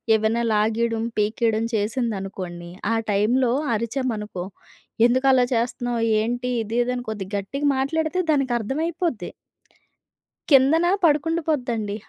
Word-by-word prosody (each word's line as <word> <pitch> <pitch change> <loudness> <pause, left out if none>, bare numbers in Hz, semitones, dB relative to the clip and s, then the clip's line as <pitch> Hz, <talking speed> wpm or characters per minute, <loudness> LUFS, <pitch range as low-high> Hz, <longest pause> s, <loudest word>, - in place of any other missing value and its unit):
ఏవైనా 220 +2 +1
లాగేయడం, 225 +1 +1
పీకేయడం 220 +1 +1
చేసిందనుకోండి, 195 -6 -3 0.2
ఆ - - +1 0.2
టైంలో 235 +5 +2 0.2
అరిచామనుకో, 220 -5 -3 0.6
ఎందుకు 260 +2 +1
అలా 250 -1 +4
చేస్తున్నావు? 240 0 -1 0.2
ఏంటి 245 +2 -2
ఇది 225 +3 -4
ఇది 250 - -2
అని 245 - -4
కొద్దిగా 205 -2 -5
గట్టిగా 275 +9 -2
మాట్లాడితే 320 +6 0
దానికి 275 -4 +1
అర్థమైపోద్ది. 310 - -2 1.2
కిందన 285 +5 +5 0.2
పడుకుండిపోద్దండి. 290 -9 0
235 Hz, 105 wpm, -23 LUFS, 215-270 Hz, 1.2 s, కిందన